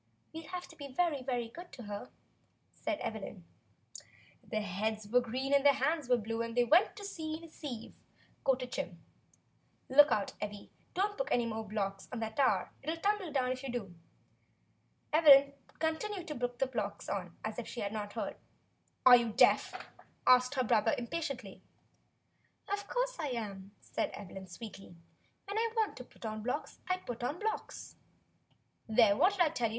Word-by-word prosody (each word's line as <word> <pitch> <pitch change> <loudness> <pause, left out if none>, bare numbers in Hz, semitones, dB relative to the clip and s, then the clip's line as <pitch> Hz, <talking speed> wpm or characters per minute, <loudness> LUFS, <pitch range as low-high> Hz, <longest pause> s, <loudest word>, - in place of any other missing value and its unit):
"We'll 320 -1 -7
have 360 -1 -5
to 325 - -13
be 285 -2 -7
very, 290 +1 0
very 245 -2 -1
good 345 +9 -11
to 255 -4 -8
her," 205 -1 -6 0.6
said 315 -2 -3
Evelyn. 200 -4 -5 1.0
"Their 215 -1 -2
heads 210 +2 -2
were 250 +4 +4
green 260 +4 -2
and 280 -1 +5
their 285 -1 +6
hands 290 0 0
were 250 - +5
blue, 225 +1 -3
and 230 +1 -4
they 245 - +6
went 320 - +4
to 405 - -7
sea 315 -5 -4
in 330 - -14
a - - -9
sieve," 255 -8 -7 0.5
quoted 255 -2 +1
Jim. 175 -7 -4 0.9
"Look 290 +3 +7
out, 205 -2 +1
Evvy, 205 -1 -6 0.2
don't 410 +4 0
put - - 0
any 240 -1 +2
more 225 -1 -3
blocks 195 -2 -3
on 250 - -4
that 220 -1 -4
tower; 275 -2 +3
it'll 315 +4 -2
tumble 400 -1 0
down 255 -3 +1
if 255 0 -3
you 270 -2 -4
do." 210 -7 -4 1.2
Evelyn 280 -3 +8 0.2
continued 345 +4 -2
to 300 - -3
put 245 0 -2
blocks 210 -4 -3
on, 180 -4 -4
as 220 +2 -3
if 235 - -5
she 240 - -5
had 200 +1 -2
not 205 -1 -4
heard. - - -3 0.7
"Are 255 -1 +11
you 235 -2 +2
deaf?" 215 - +3 0.4
asked 255 +2 +6
her 260 - +2
brother. 225 -1 +3
THE 245 - -3
LETTER 335 +8 -3
7 255 -10 -5 1.1
"Sometimes - - -1
I 305 - -1
am," 200 -3 -6
said - - -2
Evelyn 190 -1 -8
sweetly. 195 -1 -10 0.5
"WTien 405 +2 -3
I 455 0 +1
want 440 -2 +1
to 250 - -7
put 240 - -13
on 215 0 -3
blocks, 250 +7 -3
I 370 - +4
want 370 - -13
to 245 - -2
put 235 - -9
on 285 +6 -1
blocks." 440 +1 -4 0.9
"There, 220 -2 +6
what 365 - +4
did 390 - -1
I 335 - +6
tell 245 -5 0
you. - - -4
250 Hz, 185 wpm, -33 LUFS, 220-315 Hz, 1.2 s, Are